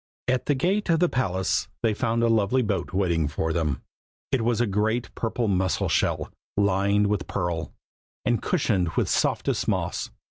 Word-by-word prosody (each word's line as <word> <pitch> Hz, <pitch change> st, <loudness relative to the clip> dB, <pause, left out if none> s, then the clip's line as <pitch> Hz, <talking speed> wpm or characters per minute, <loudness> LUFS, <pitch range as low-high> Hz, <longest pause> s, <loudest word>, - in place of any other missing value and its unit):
At 130 Hz, 0 st, 0 dB
the 145 Hz, -, +3 dB
gate 190 Hz, +9 st, 0 dB
of 165 Hz, -1 st, +4 dB
the 180 Hz, -, +4 dB
palace 95 Hz, -, 0 dB, 0.2 s
they 110 Hz, -2 st, +3 dB
found 115 Hz, +1 st, 0 dB
a -, -, +4 dB
lovely 115 Hz, +3 st, +2 dB
boat 100 Hz, -5 st, -2 dB
waiting 85 Hz, -5 st, +1 dB
for 80 Hz, +2 st, -1 dB
them. 80 Hz, -5 st, -1 dB, 0.5 s
It 135 Hz, -3 st, +2 dB
was 115 Hz, 0 st, +1 dB
a 120 Hz, -, +3 dB
great 110 Hz, +4 st, 0 dB
purple 115 Hz, 0 st, -1 dB
mussel 95 Hz, -2 st, +1 dB
shell, -, -, 0 dB, 0.3 s
lined 100 Hz, +1 st, +3 dB
with 100 Hz, -3 st, -1 dB
pearl, 85 Hz, -4 st, -2 dB, 0.5 s
and 120 Hz, -3 st, +1 dB
cushioned 110 Hz, -, +1 dB
with -, -, +1 dB
softest -, -, 0 dB
moss. -, -, -1 dB
105 Hz, 170 wpm, -25 LUFS, 95-120 Hz, 0.5 s, of